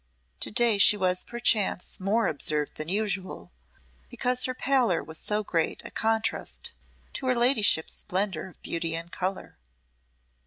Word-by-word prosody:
To - - -2
day 225 -1 +3
she 210 - +6
was 185 -2 +1
perchance 225 -6 0
more 210 +5 +1
observed 150 0 0
than 155 +1 -4
usual, 195 -1 -2 0.6
because 250 - +1
her 255 - -3
pallor 255 -11 +1
was 160 +1 -3
so 210 0 -2
great 165 -5 -1
a - - -7
contrast 225 0 -2 0.4
to 265 - -5
her 255 - +2
ladyship's 235 -9 +3
splendour 190 -3 -2
of 185 - -18
beauty 165 -1 -1
and 170 +1 -3
colour. 185 - -5
200 Hz, 145 wpm, -27 LUFS, 170-230 Hz, 0.6 s, she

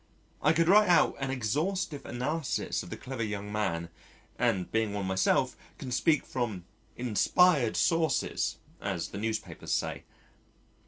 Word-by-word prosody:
I 150 - +4
could 165 0 +2
write 205 +1 +6
out 175 - +5
an 135 -1 -2
exhaustive 145 - -1
analysis 145 +4 -2
of - - -10
the - - -6
clever 130 -2 -6
young 105 -2 -3
man, 85 -6 -1 0.5
and 95 -2 +1
being 110 -2 0
one 100 -1 -2
myself 95 0 +2 0.2
can 130 - -7
speak 150 +4 +2
from 110 -9 -3 0.3
"inspired 125 - +3
sources" 160 -6 +1 0.2
as - - -3
the - - -6
newspapers 110 0 -4
say. - - -2
125 Hz, 140 wpm, -29 LUFS, 105-155 Hz, 0.5 s, write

